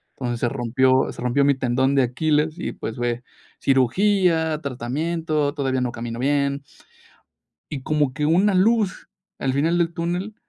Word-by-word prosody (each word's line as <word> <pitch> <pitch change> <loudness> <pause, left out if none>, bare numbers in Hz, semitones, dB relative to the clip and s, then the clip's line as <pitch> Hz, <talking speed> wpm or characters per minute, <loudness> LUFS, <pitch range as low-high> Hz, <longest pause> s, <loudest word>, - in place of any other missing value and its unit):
entonces, 120 -3 -4
se 120 - +2
rompió 130 +1 +2
se - - -10
rompió 130 +3 +2
mi 140 -1 +4
tendón 130 +2 +1
de 135 - +4
Aquiles 155 +5 0
y, - - -3
pues, 110 - -6
fue 120 0 -2 0.4
cirugía, 160 - +2
tratamiento, 150 +4 -2
todavía 130 -3 -1
no 125 -1 -1
camino 115 0 -6
bien 140 +1 0 1.1
y 135 -3 -5
como 150 -4 0
que 150 0 -2
una 185 +5 +3
luz 210 0 +1 0.3
al 130 -1 -1
final 165 +5 +1
del 170 -1 0
túnel, 180 +5 -3
140 Hz, 155 wpm, -22 LUFS, 130-165 Hz, 1.1 s, mi